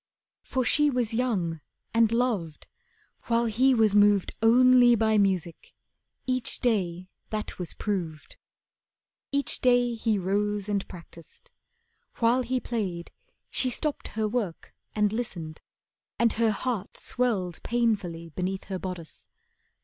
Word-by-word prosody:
For 260 -2 -2
she 295 +5 +4
was 245 -4 -1
young, 195 -10 -1 0.3
and 225 -1 +4
loved, 225 -10 -1 0.6
while 235 0 +2
he 250 +4 +3
was 220 -3 +3
moved 205 -2 +4
Only 245 +1 +6
by 220 -1 +2
music. 185 -4 -1 0.5
Each 255 -2 -1
day 185 -7 0 0.2
that 215 -2 -5
was 175 -3 -4
proved. 170 -7 -4 1.0
Each 280 0 0
day 245 -1 +3
he 225 -2 0
rose 205 +2 -1
and 200 -2 -1
practised. 170 - -14 0.6
While 235 +2 +2
he 255 +1 -1
played, 195 -8 -4 0.4
She 255 - +2
stopped 300 +4 -3
her 220 0 -2
work 210 -7 -4 0.2
and 210 -1 +2
listened, 170 -9 -5 0.6
and 235 -1 +3
her 230 0 +2
heart 215 -1 -3
Swelled 200 -9 -1
painfully 200 -9 -1
beneath 185 +4 -3
her 190 -1 -5
bodice. 180 -4 -8
215 Hz, 125 wpm, -27 LUFS, 185-240 Hz, 1.0 s, Only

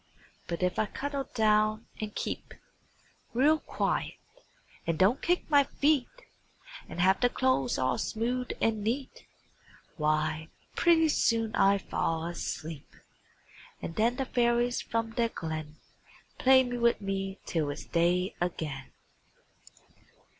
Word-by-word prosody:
But 170 +1 -3
if 180 0 0
I 215 - +2
cuddle 280 +2 -4
down 215 0 +2
and 215 -1 -5
keep - - -4 0.8
Real 300 +5 +4
quiet, - - -2 0.7
and 165 -1 0
don't 205 +9 +3
kick 355 +1 +1
my 285 -2 +5
feet, 285 -1 +1 0.8
And - - -7
have 190 +2 +4
the 245 - +4
clothes 245 - +1
all 130 -1 0
smooth 245 +3 -2
and 220 -2 +1
neat, 255 +5 -3 0.7
Why, 155 0 0 0.3
pretty 325 -2 +4
soon 225 -5 +1
I 200 +1 +4
fall 165 -4 -2
asleep; 165 -3 -6 0.8
And 165 - -6
then 230 +5 +2
the 270 0 -2
fairies 240 0 +1
from 230 0 -2
their 230 0 0
glen 155 -5 -5 0.6
Play 260 0 +6
with 240 -1 +1
me 195 -1 -3
till 155 -4 -1
it's 145 - -6
day 180 +2 +1
again. 150 -6 -3
215 Hz, 125 wpm, -29 LUFS, 170-245 Hz, 0.8 s, Play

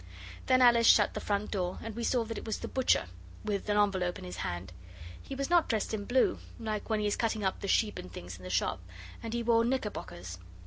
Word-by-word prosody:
Then 255 0 +5
Alice 235 -1 +6
shut 205 - +6
the - - -3
front 205 0 -1
door, 180 -3 -1
and 225 -2 -6
we 235 - -3
saw 245 0 +2
that 225 0 -5
it - - -10
was 220 - -2
the - - -6
butcher, 260 -1 +2 0.4
with 205 0 -2
an 205 - +2
envelope 190 -4 +2
in - - -9
his 90 0 -7
hand. 90 +1 -4 0.5
He 270 - -7
was 275 +4 -3
not 345 -2 +4
dressed 220 -1 0
in 205 -2 -3
blue, 255 +3 +2 0.2
like 215 -2 -3
when 220 -1 +1
he 210 - -1
is 205 - +1
cutting 220 -2 -1
up 190 - 0
the 200 - -5
sheep 210 +2 +2
and 90 - -9
things 90 +1 -8
in 90 - -14
the 90 - -6
shop, 90 0 0 0.4
and 230 - -5
he 235 0 -1
wore 230 0 +4
knickerbockers. 90 - -3
210 Hz, 240 wpm, -31 LUFS, 180-230 Hz, 0.5 s, Alice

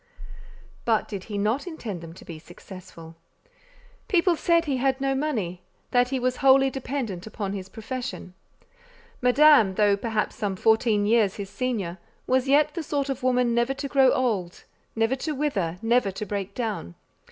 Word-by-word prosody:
But 225 -2 +1
did 195 -3 -6
he 210 -2 -5
not 220 - 0
intend 225 - -6
them 165 -1 -9
to - - -14
be 165 -2 -8
successful? 170 -1 -12 0.9
People 360 -4 +3
said 335 +1 +2
he 280 -4 -1
had 265 +1 +1
no 270 0 0
money, 225 - -2 0.3
that 245 0 +3
he 265 - -1
was 250 0 -1
wholly 270 -1 +5
dependent 245 -8 -4
upon 205 -3 -4
his 190 -1 -6
profession. 240 -4 -6 0.9
Madame—though 225 -7 +5
perhaps 220 0 -2
some 205 -4 -2
fourteen 220 0 +2
years 215 -3 +3
his 200 -1 -7
senior—was 245 +3 -2
yet 295 +2 +3
the 335 - -3
sort 285 -2 -2
of 270 0 -3
woman 250 -2 +2
never 240 +3 +1
to 280 0 -4
grow 270 -1 +4
old, 205 -9 -1 0.3
never 225 +3 +1
to 300 +3 -3
wither, 200 - -1
never 235 -2 +2
to 195 +2 -5
break 200 -1 -4
down. 215 - -4
235 Hz, 160 wpm, -25 LUFS, 200-270 Hz, 0.9 s, wholly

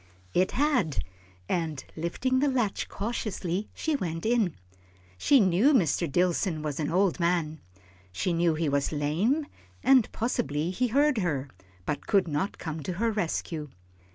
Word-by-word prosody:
It 185 +1 +2
had, 250 - +1 0.4
and 160 -6 -2
lifting 250 +11 0
the 290 - +2
latch 240 -6 -1
cautiously, 205 -3 -3
she 315 -2 -1
went 165 - -3
in. 225 -7 +2 0.6
She 270 - +4
knew 205 - +4
Mr. 170 - +2
Dillson 175 -1 +1
was 150 -1 -3
an 150 -1 -1
old 185 0 +2
man, 170 -3 0 0.5
she 95 - -1
knew 165 -1 +2
he 160 0 -1
was 140 0 +1
lame, 170 - +1 0.4
and 260 -4 +5
possibly 180 - -1
he 250 +7 0
heard 280 +1 +3
her, 145 -7 -1 0.4
but 145 - -3
could 195 -4 +3
not 160 +6 -2
come 160 -1 -5
to 180 - -3
her 225 +6 0
rescue. 165 -6 -2
180 Hz, 150 wpm, -28 LUFS, 155-230 Hz, 0.6 s, and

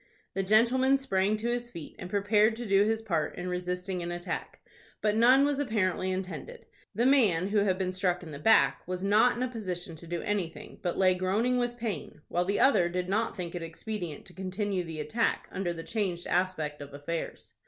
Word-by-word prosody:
The 195 - 0
gentleman 240 +7 +4
sprang 205 -5 +1
to 230 +3 -2
his 240 0 -2
feet, 170 -9 -9
and 180 - -6
prepared 210 +2 +3
to 240 +1 -6
do 200 -1 +4
his 220 +1 0
part 165 -8 -1
in 180 - -5
resisting 180 +1 -3
an 170 0 -4
attack; 175 +1 -5 0.4
but 210 -1 +1
none 255 +5 +6
was 285 -1 0
apparently 190 -8 0
intended. 190 - -5 0.3
The 235 - +2
man, 205 -10 +4
who 210 0 +3
had 195 -2 +2
been 185 -1 -1
struck 185 -1 -1
in 160 - -9
the 140 - -7
back, 140 -7 +4
was 185 0 -3
not 220 +5 +4
in 250 - -1
a - - +1
position 185 -8 -5
to 170 - -12
do 170 0 -3
anything, 190 -6 -3
but 175 - -2
lay 185 -1 +5
groaning 210 +8 +1
with 240 0 -1
pain, 205 -10 -5
while 175 +1 0
the 200 +2 0
other 180 -11 +4
did 180 +1 -3
not 220 +3 0
think 175 -2 -4
it 175 - -4
expedient 165 -1 -6
to 180 - -15
continue 190 0 -2
the 165 -2 -7
attack 220 +11 0
under 185 -2 -2
the 165 -1 -6
changed 185 -5 -2
aspect 160 -5 -1
of 140 0 -9
affairs. 160 +3 -5
190 Hz, 205 wpm, -29 LUFS, 175-220 Hz, 0.4 s, none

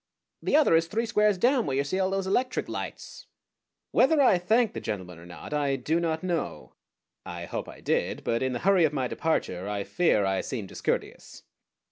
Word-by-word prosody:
"The - - +1
other 300 - +5
is 165 0 +3
three 225 +6 -1
squares 210 -3 +2
down, 245 +4 +2
where 135 - -1
you 140 - +2
see 185 +7 -2
all 190 0 +1
those 195 0 -1
electric 250 +7 0
lights." - - -7 0.6
Whether 320 -2 +4
I 245 -10 +5
thanked 220 +5 +2
the - - -5
gentleman 90 -5 -5
or 85 - -13
not 85 - -9
I 145 -2 +1
do 150 +6 0
not 160 -1 -2
know. 175 -3 -3 0.5
I 85 0 -7
hope - - -5
I - - -12
did; - - -1
but 115 0 0
in 130 -1 0
the - - -1
hurry 195 -3 +5
of 155 -2 +2
my 130 -3 -1
departure 100 - -2
I 100 -1 -2
fear 105 - +2
I 95 0 0
seemed 110 -8 -5
discourteous. - - -4
160 Hz, 200 wpm, -27 LUFS, -, 0.6 s, other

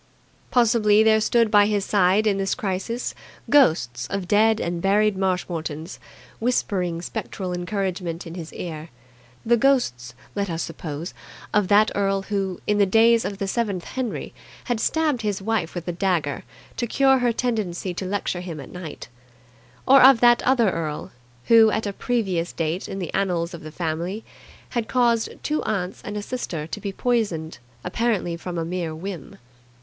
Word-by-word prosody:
Possibly 220 -3 +4
there 220 0 +4
stood 230 0 +2
by 205 -1 +6
his 205 -2 0
side 200 +1 +3
in 200 -2 +2
this 195 0 0
crisis 220 +2 -3 0.4
ghosts 125 - +3
of 195 -2 -3
dead 220 +2 +4
and 170 0 -2
buried 205 +2 +3
Marshmoretons, 175 -4 -3 0.4
whispering 185 -8 -1
spectral 185 0 -4
encouragement 180 -2 -3
in 165 - -8
his 170 -2 -7
ear 160 -2 -6 0.6
the 235 +1 +4
ghosts, 170 - +1 0.2
let 200 -1 -2
us 165 -1 -2
suppose, 165 0 -6 0.4
of 210 -2 +3
that 210 +2 +5
earl 195 -1 0
who, 195 -2 -2
in 210 0 +1
the 200 - +4
days 225 +3 +4
of 200 - -3
the 200 -1 -3
seventh 200 -4 -1
Henry, 255 -4 -4 0.3
had 240 -3 -1
stabbed 305 -2 +1
his 205 -3 -1
wife 195 -5 -2
with 175 -1 -5
a - - 0
dagger 170 -5 -1 0.3
to 240 - -1
cure 265 +2 +4
her 245 -1 +2
tendency 210 -7 -2
to 175 - -5
lecture 185 -2 -2
him 170 -4 -6
at 135 - -10
night; 180 -4 -8 0.8
or 270 +1 +8
of 265 -2 +8
that 240 0 +5
other 240 -6 +3
earl 155 -3 -4 0.3
who, 225 -1 +7
at 220 +1 -1
a 200 - -3
previous 190 -8 -1
date 165 +3 -3
in 195 - -5
the 180 -4 -5
annals 180 -3 0
of 170 - -8
the 155 - -8
family, 170 +6 -3 0.5
had 235 -3 -2
caused 235 -3 +2
two 305 0 0
aunts 195 -4 -3
and 210 0 -5
a 205 - -4
sister 185 -11 -4
to 165 - -6
be 200 - -3
poisoned 195 - -1 0.2
apparently 195 -3 -1
from 175 +1 -6
a 165 - -1
mere 170 -2 -3
whim. 175 -1 -7
195 Hz, 170 wpm, -23 LUFS, 175-225 Hz, 0.8 s, or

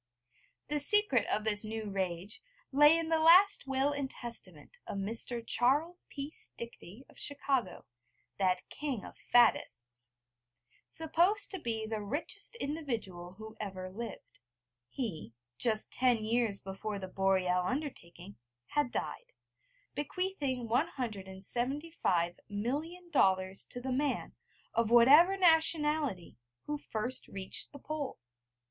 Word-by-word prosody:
The 295 0 0
secret 290 - +5
of 210 - 0
this 210 -1 +3
new 220 0 -4
rage 190 +2 -3 0.3
lay 295 +4 +7
in 330 -1 -2
the 325 -1 +3
last 355 +1 +6
will 270 +1 +1
and 285 -2 -3
testament 240 - -9
of - - -4
Mr. 230 +4 +1
Charles 290 +11 +1
P. 285 +1 -5
Stickney 235 - -8
of - - -16
Chicago, 270 -8 -1 0.5
that 185 -2 +1
king 275 -8 -4
of - - -11
faddists, 120 - +1 0.8
supposed 350 +6 +1
to 380 - -4
be 225 -6 -2
the 215 -1 -3
richest 285 - -3
individual 235 - -4
who 220 +2 -10
ever 185 -3 -5
lived: 230 +4 -8 0.5
he, 180 - -5 0.3
just 220 -3 +1
ten 250 -2 +3
years 225 -3 +1
before 200 +2 -5
the 190 -1 -6
Boreal 185 -1 +1
undertaking, 180 - -5 0.3
had 295 -3 +1
died, - - -5 0.6
bequeathing 290 -6 -2
175 240 - -1
million 300 - -4
dollars 190 - +2
to 245 - -7
the 260 +1 -4
man, 275 +2 -1 0.4
of 230 -1 +1
whatever 290 +11 +7
nationality, 310 - +3 0.3
who 295 0 -4
first 245 0 -2
reached 190 -1 -3
the - - -10
Pole. 290 -1 -5
245 Hz, 120 wpm, -32 LUFS, 200-295 Hz, 0.8 s, lay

